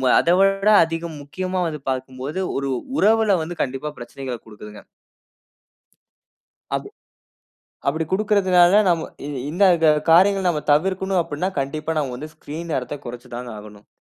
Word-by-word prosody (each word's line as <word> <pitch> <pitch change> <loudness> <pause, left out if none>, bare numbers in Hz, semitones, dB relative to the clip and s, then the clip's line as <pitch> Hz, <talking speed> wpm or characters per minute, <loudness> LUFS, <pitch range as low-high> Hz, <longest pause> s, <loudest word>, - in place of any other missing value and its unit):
மு 130 - 0
அதை 170 - +2
விட 195 +1 +3 0.2
அதிகம் 165 -1 -5
முக்கியமா 185 +5 -3
வந்து 150 -2 -6
பார்க்கும்போது, 130 +5 -4 0.2
ஒரு 140 0 -2 0.3
உறவில 220 -1 +4
வந்து 170 +2 -6
கண்டிப்பா 135 +3 -3
பிரச்சனைகளை 125 0 -6
குடுக்குதுங்க. 105 -1 -11 1.9
அதே - - -5 1.0
அப்பிடி 160 +3 0
குடுக்கிறதுனால, 190 -3 +4 0.2
நம்ம 170 -2 +1 0.2
இ - - -5 0.2
இந்த 180 +6 +1 0.2
கா 155 - +7 0.2
காரியங்கள 190 +3 +5
நம்ம 150 -3 -1
தவிர்க்கனும் 190 +4 +1
அப்பிடினா, 165 +4 -3
கண்டிப்பா 155 +4 -3
நாம 135 -3 -2
வந்து 155 +4 -8
ஸ்கிரீன் 165 +3 -7
நேரத்த 130 +3 -3
குறைச்சு 120 +1 -9
தாங்க 120 -1 -6
ஆகணும். 105 0 -14
155 Hz, 135 wpm, -22 LUFS, 135-185 Hz, 1.9 s, கா